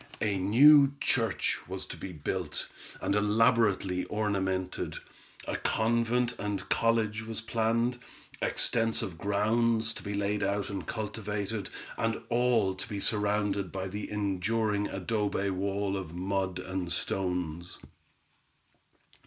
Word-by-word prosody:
A 100 -2 0
new 140 +8 +7
church 115 -6 +1
was - - -4
to - - -7
be 95 - -7
built, 80 0 -3 0.3
and - - 0
elaborately 105 -3 +3
ornamented; 95 -3 -1 0.5
a - - -1
convent 115 +2 +1
and 105 0 -3
college 110 -1 +1
was 115 -1 -2
planned; 115 +2 0 0.4
extensive 115 -7 +1
grounds 110 +3 +2
to - - -7
be 100 -1 -4
laid 100 +1 0
out 100 +1 -1
and 100 - -5
cultivated, 105 -1 -3 0.3
and 115 0 0
all 120 -5 +3
to 95 +3 -7
be 100 -2 -3
surrounded 105 -2 +1
by 95 0 -3
the 105 +2 -5
enduring 105 +1 0
adobe 100 0 -1
wall 100 +1 -1
of 90 -4 -5
mud 95 0 -1
and 90 -1 -4
stones. 90 -2 -2
105 Hz, 120 wpm, -30 LUFS, 95-115 Hz, 0.5 s, new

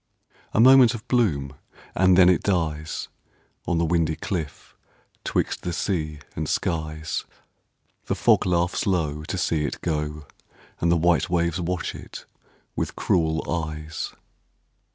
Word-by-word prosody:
A - - 0
moment 125 0 +7
of 115 +2 -10
bloom, 75 - +1 0.4
and 95 -1 +4
then 90 -2 +7
it 90 -2 +4
dies 80 -5 -1 0.6
On 85 - +1
the 85 - +2
windy 80 -1 +1
cliff 80 -6 -5 0.5
'twixt - - -1
the 90 - -3
sea 80 -4 -2 0.2
and 80 0 -3
skies. 80 -3 -2 0.8
The - - 0
fog - - +3
laughs 90 +1 +1
low 75 -5 0
to 95 - -3
see 80 -4 0
it 75 - -3
go, 75 -2 -2 0.5
And 85 - +2
the 85 - +4
white 85 0 +2
waves 85 0 0
watch 90 0 -2
it - - -10 0.5
with - - -3
cruel 80 -2 0
eyes. 80 -1 -4
85 Hz, 135 wpm, -24 LUFS, 75-90 Hz, 0.8 s, moment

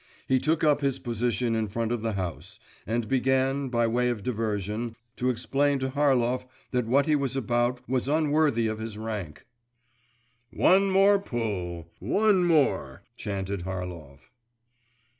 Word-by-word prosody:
He 130 0 +3
took 160 +4 0
up 150 -1 +3
his 135 -2 0
position 120 -1 -1
in 110 -1 0
front 115 +2 -2
of 120 -2 -1
the 115 -1 -1
house, 95 +2 -5 0.3
and 115 0 -1
began, 135 +1 +1
by 120 -1 +1
way 125 +2 +1
of 115 -5 -3
diversion, 110 0 -2 0.2
to 125 - 0
explain 140 +3 +1
to 130 0 -2
Harlov 130 -3 +1 0.2
that 125 -3 0
what 140 +4 +3
he 155 -1 +3
was 135 -2 -1
about 120 0 0
was 130 0 0
unworthy 150 -5 +2
of 110 0 -2
his 110 -1 -6
rank.… 105 -8 -6 1.0
'One 195 +2 +4
more 195 +1 +5
pull! 100 - -4
one 195 - +2
more!' 100 - +1
chanted 100 -1 -4
Harlov. 85 -7 -7
120 Hz, 145 wpm, -27 LUFS, 105-135 Hz, 1.0 s, more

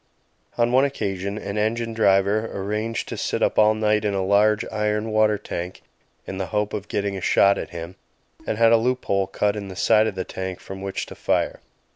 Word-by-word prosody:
On 120 0 +2
one 130 +2 +5
occasion 100 -7 -2
an 100 0 -4
engine 115 +2 -1
driver 105 0 +2
arranged 105 +3 -3
to - - -5
sit - - -1
up - - +2
all 110 0 +5
night 105 -1 +1
in 105 -2 0
a 95 -1 0
large 105 +2 +3
iron 105 0 -1
water 110 -1 +3
tank 90 -1 -6 0.4
in 95 - -6
the 95 - -2
hope 105 +3 -1
of 105 -1 -4
getting 100 -1 -2
a 95 - -5
shot 100 +2 +4
at - - -5
him, 85 +2 -7 0.5
and 105 - -1
had 115 0 +5
a 115 - +7
loop 125 +3 -1
hole 100 -1 +1
cut 105 +1 0
in 100 -2 -5
the 95 - -8
side 110 +3 +4
of 105 - -3
the 95 - -2
tank 95 -1 -5
from 95 0 -9
which 100 0 -3
to - - -10
fire. - - -1
105 Hz, 215 wpm, -23 LUFS, 95-110 Hz, 0.5 s, a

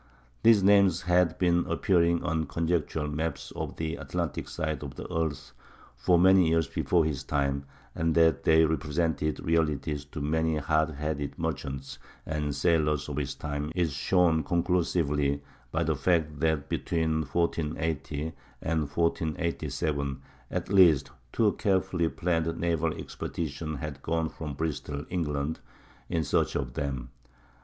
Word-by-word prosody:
These 110 -4 +6
names 100 -3 +5
had 90 -1 +3
been 85 -1 +3
appearing 85 -3 +2
on 80 -3 -1
conjectural 80 -2 -1
maps 80 +2 -3
of - - -4
the 80 0 -3
Atlantic - - -3
side 80 -1 -3
of 70 - -7
the - - -7
earth 80 -2 -2 0.4
for 60 +9 +3
many 95 0 +6
years 80 -2 +2
before 85 +2 +1
his 70 -4 -2
time; 70 -1 -1 0.3
and 80 0 0
that 80 -4 +4
they 80 0 +5
represented 75 0 0
realities 75 -2 0
to 75 +2 -8
many 80 +2 +1
hard 80 +1 +1
headed 75 -1 -3
merchants 70 -4 -4 0.3
and 75 -2 -2
sailors 75 -1 +1
of 75 - -4
his 70 -2 -2
time 75 +1 -4
is 85 -5 +1
shown 80 +3 +2
conclusively 80 -5 +1 0.3
by 85 +4 +1
the 80 -1 +1
fact 75 0 +1
that 80 -2 +1
between 80 0 0
1480 80 -1 -2 0.3
and 80 0 0
1487 80 -3 -1 0.3
at - - -3
least 85 -8 +6 0.2
two 110 -3 +3
carefully 95 -4 +1
planned 80 -1 -1
naval 85 -1 0
expeditions 75 -1 -4
had 70 -1 -6
gone 80 +1 -1
from 75 -3 -6
Bristol, 75 -1 -3
England, 75 -3 -1 0.5
in 85 -2 0
search - - +1
of 65 -4 -2
them. 65 -5 -3
80 Hz, 135 wpm, -28 LUFS, 75-85 Hz, 0.5 s, These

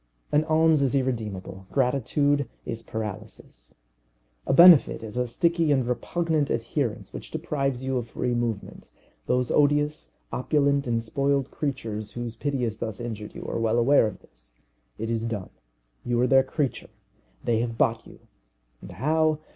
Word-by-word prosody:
An 150 +1 +3
alms 160 -1 +3
is 135 0 +1
irremediable. 105 -8 -3
Gratitude 140 +2 +1 0.2
is 115 -1 -5
paralysis. 105 - -8 0.7
A - - +2
benefit 170 -6 +7
is 110 0 -8
a 125 0 0
sticky 165 +5 +1
and 130 -4 +2
repugnant 155 +3 0
adherence 115 0 -2
which - - -8
deprives 135 -3 -2
you 130 -1 0
of 120 - -6
free 125 +1 -2
movement. 120 -4 -3 0.4
Those 125 0 +1
odious, 150 +1 +1 0.2
opulent, 140 +1 +1
and 115 -1 0
spoiled 140 +3 0
creatures 110 -7 -4
whose 120 -1 -5
pity 140 0 -2
has 110 -2 -2
thus 110 -3 -4
injured 110 -3 -6
you - - -8
are - - -3
well 115 0 +1
aware 120 0 +4
of 100 -3 -8
this. - - -21 0.4
It 115 +1 -3
is 115 0 -1
done 105 -5 -4 0.5
you 120 -1 0
are 125 - +4
their 135 +1 +5
creature. 135 0 -3 0.5
They 115 -2 +1
have 115 -1 -3
bought 115 0 +1
you - - -15 0.6
and - - -10
how? 155 - +1
125 Hz, 155 wpm, -26 LUFS, 115-145 Hz, 0.7 s, benefit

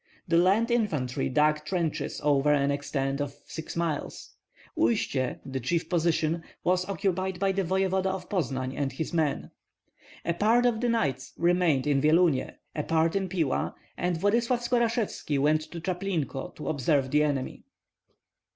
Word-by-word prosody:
The 170 -1 +3
land 205 +7 +3
infantry 155 - 0
dug 150 +2 +2
trenches 170 -1 -2
over 145 0 +3
an 140 -1 +3
extent 140 -1 -2
of 140 -1 -4
six 160 - -7
miles. 170 -3 -3 0.4
Uistsie, 125 +3 +1
the 135 -1 -3
chief 165 +7 -1
position, 165 -1 +1 0.2
was 180 +1 +1
occupied 190 -1 -1
by 195 0 +2
the 195 0 0
voevoda 190 +1 +1
of 190 -1 -4
Poznan 130 - -2
and 140 -2 -1
his 160 +6 -4
men. 155 -4 0 0.7
A 170 - +1
part 225 +7 +3
of 235 -2 +2
the 245 - +1
knights 140 - -1
remained 170 -6 +2
in 140 -2 +2
Vyelunie, 155 -1 +3 0.3
a 150 - 0
part 165 +2 +1
in 195 -1 0
Pila, 165 -7 -1 0.2
and 175 -1 -1
Vladyslav 235 +6 +1
Skorashevski 230 - 0
went 150 +3 +3
to 170 - -7
Chaplinko 175 -6 -3
to 150 - -7
observe 140 -2 +1
the 150 - +4
enemy. 145 -3 -1
165 Hz, 150 wpm, -28 LUFS, 145-190 Hz, 0.7 s, the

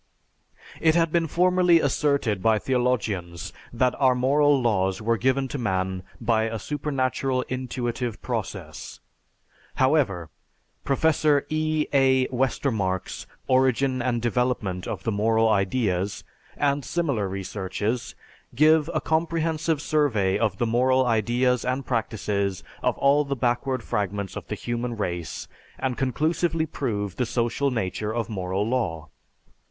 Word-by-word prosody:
It 160 0 +3
had 165 -2 +2
been 170 0 +2
formerly 180 +1 +4
asserted 140 -8 +1
by 110 +2 +3
theologians 105 -9 -1 0.2
that 125 +1 +1
our 130 -2 +4
moral 140 +3 +3
laws 95 -6 +1
were 115 +1 +1
given 130 +3 +1
to 140 - -4
man 95 -4 -1 0.2
by 110 -2 +1
a 115 0 -3
supernatural 130 0 -1
intuitive 125 -2 -3
process. 95 - -5 0.8
However, 125 - +1 0.5
Professor 150 0 +2
E. 155 0 0
A. 130 -1 +4
Westermarck's 115 -7 -1 0.2
"Origin 130 0 +2
and 120 -2 -1
Development 120 -7 -1
of - - -5
the 115 - 0
Moral 110 +2 +2
Ideas," 100 -2 0 0.3
and 140 -1 +1
similar 140 - -1
researches, 100 +4 -3 0.4
give 155 +3 +4
a 155 - +1
comprehensive 160 -1 0
survey 110 -11 +2
of 105 -5 0
the 120 - +1
moral 130 +3 +3
ideas 120 +2 +1
and 130 +1 -2
practices 105 -5 -1 0.2
of - - 0
all 140 +2 +4
the 140 -1 -3
backward 125 0 0
fragments 100 -2 -2
of - - -7
the - - -3
human 120 0 -3
race 85 -6 -4 0.3
and 130 -2 -1
conclusively 160 +5 0
prove 105 - -3
the 125 - +1
social 120 +4 0
nature 110 -3 -2
of 115 0 -2
moral 95 0 -2
law. 90 -11 -1
125 Hz, 125 wpm, -25 LUFS, 105-140 Hz, 0.8 s, formerly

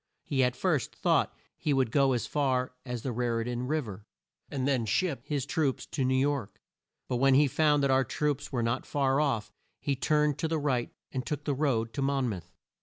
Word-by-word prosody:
He 135 -2 +1
at 125 0 +1
first 155 -10 0
thought - - +2 0.2
he 150 - 0
would 130 -4 +1
go 135 0 +4
as 120 - -1
far 130 -4 0
as 125 -2 -4
the 130 - -2
Rar 120 -1 0
i - - 0
tan 120 +1 -3
Riv 150 -3 0
er, 105 +1 -9 0.4
and 135 -2 -2
then 130 -4 +2
ship 145 - 0
his 145 -3 -1
troops 145 -3 0
to 140 - -1
New 130 +1 +2
York; 140 -5 -1 0.5
but 125 - -1
when 135 +1 +5
he 145 +2 +6
found 150 +1 +3
that 140 - +3
our 130 0 +4
troops 145 +3 -2
were 120 -4 0
not 115 +3 -1
far 135 -1 +1
off, 130 -8 0 0.3
he 140 - -1
turned 150 +1 +1
to 160 - 0
the 160 0 0
right 135 -5 0 0.2
and 130 -2 -2
took 150 +3 -4
the 145 - 0
road 125 -6 0
to 140 - -3
Mon 135 -1 +1
mouth. 90 -6 -6
135 Hz, 220 wpm, -29 LUFS, 125-145 Hz, 0.5 s, he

